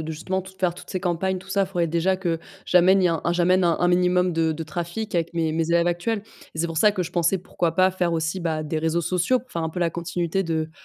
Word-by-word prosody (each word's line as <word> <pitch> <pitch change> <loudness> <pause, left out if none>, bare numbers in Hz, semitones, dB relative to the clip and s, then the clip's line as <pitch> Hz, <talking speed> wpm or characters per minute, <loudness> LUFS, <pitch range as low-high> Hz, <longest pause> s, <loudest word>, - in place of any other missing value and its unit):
de 160 0 -4
justement 185 +4 -3
tout 190 - -12
faire 175 -2 +1
toutes - - -11
ces 185 - -2
campagnes, 185 +1 -1
tout 190 +1 -15
ça, 195 0 +1
faudrait 175 -3 -1
déjà 170 +4 +1
que, 175 -3 -1 0.3
j'amène 185 +2 +5
y 180 - +4
un 165 -2 0
j'amène 180 +1 +3
un 170 -1 +3
un 175 - +3
minimum 180 0 +3
de 160 -1 +1
de 160 +1 -5
trafic 175 +6 -4
avec 170 0 -1
mes 165 -1 0
mes 160 +1 -1
élèves 170 0 +3
actuels 195 +5 -1 0.3
et - - -8
c'est 170 - 0
pour 165 - -6
ça 210 +4 +5
que 185 - -1
je 175 - -6
pensais, 175 +2 +2
pourquoi 170 -2 -2
pas 185 +1 +4
faire 180 -2 -1
aussi, 165 +3 -1
bah, 160 -3 -2
des 155 +1 -2
réseaux 160 +2 0
sociaux, 180 +9 +1
pour 255 - -24
faire 170 -5 -3
un 160 - -2
peu 180 - -5
la 170 - +2
continuité 170 +2 -2
de 160 -1 -2
175 Hz, 270 wpm, -24 LUFS, 165-185 Hz, 0.3 s, j'amène